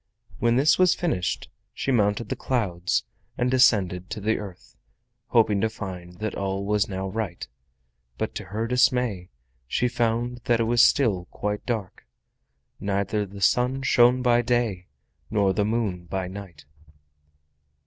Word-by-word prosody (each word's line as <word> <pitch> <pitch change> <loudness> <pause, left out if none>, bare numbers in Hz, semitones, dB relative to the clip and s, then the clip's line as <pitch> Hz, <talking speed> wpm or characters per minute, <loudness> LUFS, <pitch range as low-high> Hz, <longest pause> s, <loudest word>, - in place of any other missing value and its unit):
When 120 0 +2
this 140 +7 +4
was 185 -1 +5
finished 125 - -2 0.3
she 135 - -1
mounted 105 -1 +1
the - - -1
clouds 90 -9 -1 0.3
and 125 +1 +1
descended 95 -8 +3
to - - -5
the 110 +2 0
earth, 95 -4 -10 0.5
hoping 110 -4 +3
to 110 - +2
find 90 -5 -8
that 110 -2 -2
all 95 0 -3
was 105 0 +1
now 95 0 -3
right, 95 -4 -4 0.7
but - - -3
to - - -6
her 105 +5 -3
dismay 125 -6 +1 0.4
she 125 - +1
found 120 0 -1
that 120 -1 +2
it - - +3
was 115 +1 +4
still 100 -10 +3
quite 105 +2 -4
dark. 110 - -4 0.7
Neither 100 +1 -1
the 100 +1 -11
sun 125 +6 +2
shone 125 0 +4
by 120 -1 +4
day 115 -7 -1 0.4
nor 100 -3 +2
the 100 +2 +1
moon 105 -6 -1
by 95 +1 -3
night. 95 -6 -10
105 Hz, 150 wpm, -25 LUFS, 95-120 Hz, 0.7 s, was